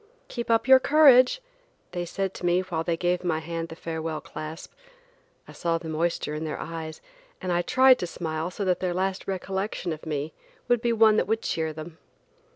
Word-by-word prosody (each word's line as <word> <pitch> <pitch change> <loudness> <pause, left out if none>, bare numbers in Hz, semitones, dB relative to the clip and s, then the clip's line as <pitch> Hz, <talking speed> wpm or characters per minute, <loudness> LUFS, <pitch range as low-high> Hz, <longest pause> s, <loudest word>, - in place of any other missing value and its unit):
"Keep 235 -1 -5
up 225 +1 +3
your 265 0 +8
courage," 280 - +6 0.5
they 175 -1 -3
said 195 +2 -3
to - - -10
me 175 +1 +3
while 170 -3 -3
they 165 0 -1
gave 180 +1 0
my 170 -3 0
hand 165 +1 -4
the 160 - -8
farewell 160 -1 -4
clasp. 155 +2 -8 0.8
I - - -11
saw 165 -1 -1
the 165 -1 -7
moisture 160 -1 -1
in 150 +1 -4
their 155 -2 -4
eyes 160 -1 -6 0.4
and 185 -2 -3
I 175 0 +2
tried 260 +6 +5
to 180 - -2
smile 160 -1 -3
so 195 +2 -4
that 180 -1 +1
their 180 -1 -1
last 190 +1 -2
recollection 190 -1 -3
of 155 +1 -10
me 150 0 -3 0.3
would 245 -2 +2
be 235 - +1
one 220 -1 +5
that - - +1
would 220 +1 0
cheer 160 -1 -1
them. 155 +1 -9
175 Hz, 200 wpm, -26 LUFS, 160-200 Hz, 0.8 s, your